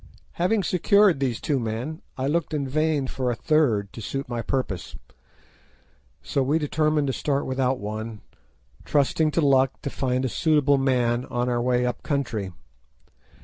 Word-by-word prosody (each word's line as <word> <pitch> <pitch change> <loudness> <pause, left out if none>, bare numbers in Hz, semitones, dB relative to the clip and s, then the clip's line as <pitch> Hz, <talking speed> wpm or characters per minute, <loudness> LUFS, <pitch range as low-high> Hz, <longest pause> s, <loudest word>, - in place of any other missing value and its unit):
Having 195 +4 +1
secured 190 -1 +4
these 130 -4 -1
two 145 -3 0
men 120 +8 -4 0.2
I 130 - -2
looked 155 +2 0
in 140 -2 -1
vain 155 0 +1
for 130 -1 -2
a 120 - 0
third 115 -9 +1
to 115 - -8
suit 135 +6 -4
my 120 -1 -3
purpose, 110 -7 -3 1.3
so 140 - -1
we 140 +4 +2
determined 155 -1 +1
to 135 - -1
start 140 +1 -1
without 130 0 0
one, 110 +1 -6 0.6
trusting 150 +2 +2
to 165 - 0
luck 135 -1 +3
to 140 - -3
find 130 0 -1
a - - +2
suitable 145 -1 +2
man 125 -2 +1
on 120 0 -2
our 120 -1 0
way 125 0 +1
up 125 - -2
country. 120 -9 -2
135 Hz, 160 wpm, -25 LUFS, 120-150 Hz, 1.3 s, secured